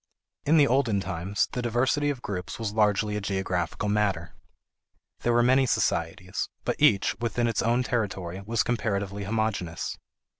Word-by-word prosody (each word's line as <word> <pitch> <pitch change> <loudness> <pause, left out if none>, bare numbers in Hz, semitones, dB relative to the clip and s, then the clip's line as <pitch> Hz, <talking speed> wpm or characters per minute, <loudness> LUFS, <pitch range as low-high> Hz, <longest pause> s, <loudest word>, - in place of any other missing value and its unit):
In 160 +2 +5
the 145 - +7
olden 125 -6 +2
times, 95 +2 -1
the 125 - -2
diversity 130 +5 +1
of 135 -4 -4
groups 90 -3 -4
was 110 -3 -3
largely 105 -1 +2
a 105 - -2
geographical 95 -1 -2
matter. 100 -5 0 0.9
There 120 - +1
were 120 0 +4
many 130 +2 +4
societies, - - -1 0.2
but - - 0
each, 100 - +4
within 120 +1 0
its 115 -2 +1
own 120 +2 +2
territory, 95 -7 -2
was 110 0 +1
comparatively 100 -4 -2
homogeneous. 105 -6 -2
105 Hz, 150 wpm, -27 LUFS, 100-120 Hz, 0.9 s, the